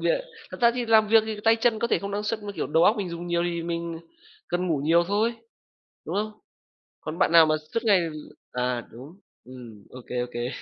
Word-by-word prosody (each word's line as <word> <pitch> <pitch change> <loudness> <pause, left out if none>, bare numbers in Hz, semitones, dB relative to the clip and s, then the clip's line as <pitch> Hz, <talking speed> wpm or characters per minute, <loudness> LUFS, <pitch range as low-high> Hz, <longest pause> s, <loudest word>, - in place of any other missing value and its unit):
việc - - +1 0.3
thật - - -9
ra 235 -1 +6
thì 245 -1 -2
làm 220 -1 +4
việc 225 0 +6
thì 220 - -4
tay 225 0 +5
chân 225 -1 +1
có 235 - 0
thể - - +2
không 200 0 -6
năng 205 +1 -2
suất 215 0 -3
mà, 205 - -6
kiểu, - - -3
đầu 160 +4 +3
óc 215 - +4
mình 200 -4 -3
dùng 170 +1 -6
nhiều 170 0 0
thì 170 -1 -2
mình 170 -1 -4 0.5
cần 180 +1 -1
ngủ 160 -5 0
nhiều 170 +2 +4
thôi. 215 +4 +1 0.7
Đúng - - -5
không? 215 +1 -2 0.7
Còn 155 +2 -6
bạn 170 - +2
nào 165 -1 +8
mà 155 - +2 0.2
suốt 230 - 0
ngày 200 -4 +5 0.5
à, 125 -1 -2
đúng, 140 +10 -12 0.3
ừm, 120 -5 -12
ô 130 - -10
kê, 125 - -4
ô 125 - -2
kê. 120 +1 -3
175 Hz, 235 wpm, -25 LUFS, 155-215 Hz, 0.7 s, nào